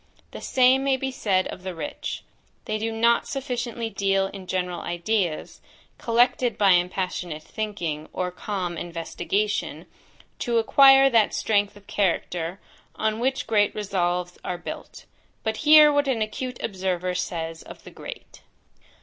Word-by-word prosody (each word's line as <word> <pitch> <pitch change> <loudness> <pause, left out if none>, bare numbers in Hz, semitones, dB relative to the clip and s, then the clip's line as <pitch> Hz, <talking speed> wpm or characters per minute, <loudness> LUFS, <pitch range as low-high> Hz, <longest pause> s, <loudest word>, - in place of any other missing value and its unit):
The - - -8
same 260 +1 +4
may 270 -1 +2
be 265 0 -3
said 195 -7 +1
of - - -7
the 185 -1 -6
rich; 160 -2 -5 0.4
they 215 - -2
do 225 +1 -2
not 235 +1 +2
sufficiently 245 -4 -3
deal 195 -1 +1
in 190 -2 -10
general 180 -1 -2
ideas, 175 -1 -2 0.4
collected 240 +1 +2
by 200 -2 +5
impassionate 180 -3 0
thinking, 170 -9 -4
or 180 0 -2
calm 180 -2 -4
investigation, 185 +5 -2 0.5
to 240 -2 0
acquire 270 +4 +7
that 225 -3 +3
strength 205 -2 +1
of 205 - -18
character, 180 -2 -1 0.4
on 220 0 -1
which 265 +2 0
great 210 -2 +2
resolves 180 -3 -2
are 180 - -3
built. 175 - -9 0.4
But 220 0 -1
hear 300 -1 +7
what 285 0 +2
an 235 -5 +1
acute 250 +4 -5
observer 185 -3 -2
says 165 -2 -4
of - - -12
the - - -12
great. - - -10
205 Hz, 140 wpm, -25 LUFS, 180-235 Hz, 0.5 s, acquire